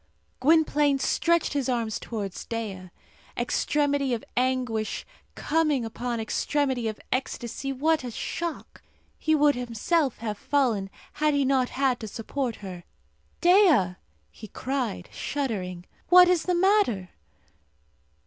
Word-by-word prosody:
Gwynplaine 295 -1 +3
stretched 335 +4 +1
his 275 -2 -1
arms 230 -3 -1
towards 205 -5 -5
Dea. 200 -5 -5 0.5
Extremity 280 +2 +1
of 225 - -7
anguish 250 -4 -1 0.3
coming 300 -5 +1
upon 235 +1 -3
extremity 260 +2 0
of 215 -1 -4
ecstasy, 255 +1 -3
what 310 +3 +1
a 250 - -4
shock! 335 +7 -5 0.4
He 315 - +2
would 295 -1 +4
himself 250 +4 0
have 215 -2 -4
fallen, 235 -9 +1 0.2
had 300 -1 +1
he 280 -1 +2
not 260 -2 +2
had 265 -2 0
to 220 - -6
support 240 +3 -3
her. 180 -2 -7 0.6
"Dea!" 345 - +5 0.4
he 215 - -11
cried, 255 -3 -3
shuddering, 190 -11 -3 0.2
"what 360 0 +9
is 355 -2 +2
the 360 - +1
matter?" 350 - +2
260 Hz, 120 wpm, -26 LUFS, 225-295 Hz, 0.6 s, what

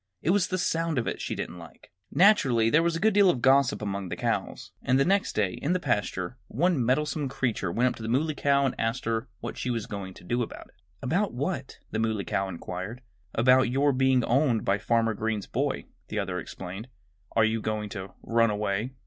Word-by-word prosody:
It 170 - +3
was 200 0 +3
the 185 - -1
sound 165 -3 0
of 120 - +1
it - - 0
that - - -7
she - - -3
didn't 90 - -5
like. 85 - -14 0.2
Naturally 135 - +4
there 155 - +5
was 170 0 +1
a - - -2
good 220 +2 +3
deal 200 -2 +6
of 165 - +1
gossip 135 -1 +3
among 100 -2 -3
the - - -3
cows. - - -2
And 130 +2 +2
the 135 - +4
next 200 +2 +2
day, 100 -3 +1
in 155 +5 +1
the 185 - +1
pasture, 105 - -1
one 165 0 +1
meddlesome 145 +3 0
creature 120 -9 -1
went 125 +7 +2
up - - -5
to - - -10
the 110 - -4
Muley 150 +6 +1
Cow 140 -1 +2
and 135 - +1
asked 115 +2 -1
her 115 +2 -1
what - - -6
she - - -2
was 115 -3 -1
going 95 -2 -6
to - - -14
do 120 +7 -1
about 115 - -6
it. - - -30 0.2
"About - - 0
what?" - - -3
the 110 - -1
Muley 110 -3 0
Cow 95 0 -1
inquired. 95 +6 -6 0.3
"About 125 +1 +5
your 140 +3 +2
being 130 -1 +3
owned 125 -2 +2
by 100 +1 +2
Farmer 115 0 +2
Green's 110 -1 -2
boy," - - -2 0.2
the - - -5
other - - -1
explained. 95 +5 -7 0.5
"Are 110 - +5
you 110 0 0
going 105 -1 -2
to 95 -1 -7
run 115 0 +3
away?" 105 +3 -1
120 Hz, 225 wpm, -27 LUFS, 105-140 Hz, 0.5 s, deal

